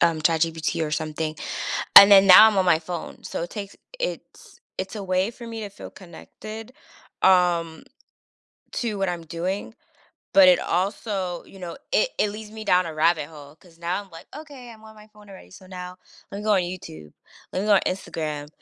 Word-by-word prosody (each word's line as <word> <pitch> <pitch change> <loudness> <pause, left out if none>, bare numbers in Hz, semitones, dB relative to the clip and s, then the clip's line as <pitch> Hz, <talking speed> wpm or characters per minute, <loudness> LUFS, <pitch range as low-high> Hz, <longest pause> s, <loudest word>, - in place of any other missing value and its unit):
um, 165 -2 +2
ChatGPT 165 0 0
or 150 - -5
something, 155 0 -3 0.6
and 200 +1 +12
then 195 -1 +8
now 195 +4 +10
I'm 210 - -2
on 190 - +3
my 170 -3 +4
phone. 170 +1 -8
So, - - -5
it 175 - -6
takes 205 -2 -8 0.2
it's - - -7 0.2
it's 190 +3 -5
a 200 - -6
way 185 +3 0
for 235 0 -12
me 225 -1 -7
to 205 - -6
feel 200 - -12
connected, 215 +5 -11 0.5
um, 175 -3 +2 0.9
to 225 -4 -3
what 195 -1 -1
I'm 170 -2 -5
doing, 185 +7 -4 0.6
but 285 -2 +7
it 270 - +6
also 185 -1 -3
you 195 - -15
know, 175 -1 -7 0.2
it - - +2
it 210 - +1
leads 215 0 -9
me 220 0 -9
down 180 -2 +2
a 160 - -7
rabbit 155 -1 +1
hole 145 -2 -13
'cause 170 -2 -22
now 170 +3 -2
I'm 195 - -20
like, 165 - -13
"Okay. 280 -6 -11
I'm 220 -1 -17
on 220 - -14
my 210 0 -15
phone 210 -1 -19
already. 190 - -14
So 185 0 -14
now 180 -1 -9 0.4
lemme 200 +1 -6
go 215 - +2
on 185 - +2
YouTube. 80 - -8 0.4
Lemme 195 +3 -2
go 210 - +5
on - - +4
Instagram." 155 -5 -4
185 Hz, 195 wpm, -23 LUFS, 165-210 Hz, 0.9 s, and